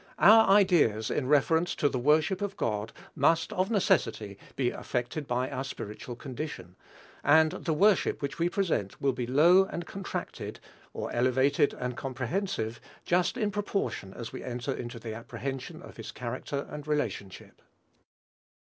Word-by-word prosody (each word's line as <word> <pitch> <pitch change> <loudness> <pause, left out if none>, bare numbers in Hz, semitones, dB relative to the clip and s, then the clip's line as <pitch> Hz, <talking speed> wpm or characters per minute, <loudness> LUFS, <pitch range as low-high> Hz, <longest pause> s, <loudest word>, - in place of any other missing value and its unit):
Our 220 +3 +7
ideas 170 - +4
in 130 - -1
reference 160 +4 +3
to 145 - +2
the 130 -3 -1
worship 155 +8 +3
of 200 -1 -3
God 105 0 -2 0.2
must, 165 0 +2
of 185 +1 0
necessity, 115 - +1 0.2
be 125 -2 +1
affected 125 +4 -3
by 125 +1 0
our 135 -1 -3
spiritual 120 -2 -7
condition; 125 - -7 0.5
and 155 +2 +5
the 165 - -2
worship 195 +4 +3
which 140 +2 -4
we 170 +1 +2
present 175 - -1
will 135 -1 +1
be 125 -1 -3
low 170 +9 +6
and 175 -3 -5
contracted, 195 +3 -6 0.3
or - - -5
elevated 130 +4 +2
and 125 -1 -4
comprehensive, 125 - -3 0.2
just 175 0 +2
in 210 -2 0
proportion 200 - -2
as 115 0 -7
we 130 - -6
enter 125 +2 -3
into 120 -1 -6
the 115 -1 -6
apprehension 125 +3 -6
of - - -12
his - - -7
character 140 0 -4
and 150 0 -7
relationship. 145 -10 -3
140 Hz, 150 wpm, -29 LUFS, 120-175 Hz, 0.5 s, Our